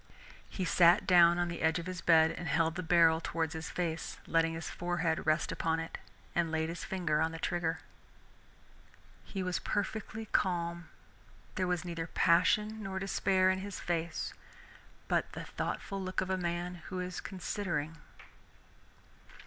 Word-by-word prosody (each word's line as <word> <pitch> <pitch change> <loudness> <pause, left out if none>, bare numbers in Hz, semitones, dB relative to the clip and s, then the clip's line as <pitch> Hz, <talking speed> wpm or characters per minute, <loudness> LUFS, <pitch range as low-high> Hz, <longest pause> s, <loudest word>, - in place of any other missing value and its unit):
He 185 - -3
sat 170 0 +5
down 175 -1 +6
on 175 0 +1
the 170 0 -5
edge 160 +1 +3
of 170 - -5
his 185 -1 -5
bed 160 -1 +5
and 175 +1 -6
held 165 0 +2
the 180 - -3
barrel 165 -2 +4
towards 165 -1 -2
his 160 0 -5
face, 165 -2 -3
letting 165 0 +2
his 165 - -5
forehead 175 -2 -1
rest 155 +1 +2
upon 160 0 0
it, 165 0 -6 0.3
and 170 -1 +1
laid 160 0 0
his 170 +1 -5
finger 175 -5 0
on 160 0 +1
the 165 - -6
trigger. 165 -1 -1 1.4
He 195 -2 -4
was 180 -1 -1
perfectly 215 +1 -3
calm, 170 -4 -1 0.6
there 185 -2 -1
was 180 -1 -1
neither 165 -2 -4
passion 210 +7 +3
nor 195 -2 -4
despair 190 -1 +2
in 185 - -1
his 200 0 -6
face, 170 -1 -2 0.7
but - - 0
the - - -5
thoughtful 195 -1 -4
look 185 0 -2
of 185 - -1
a - - +2
man 175 0 -3
who 185 - -4
is 180 0 -4
considering. 170 -4 -3
175 Hz, 160 wpm, -32 LUFS, 165-185 Hz, 1.4 s, down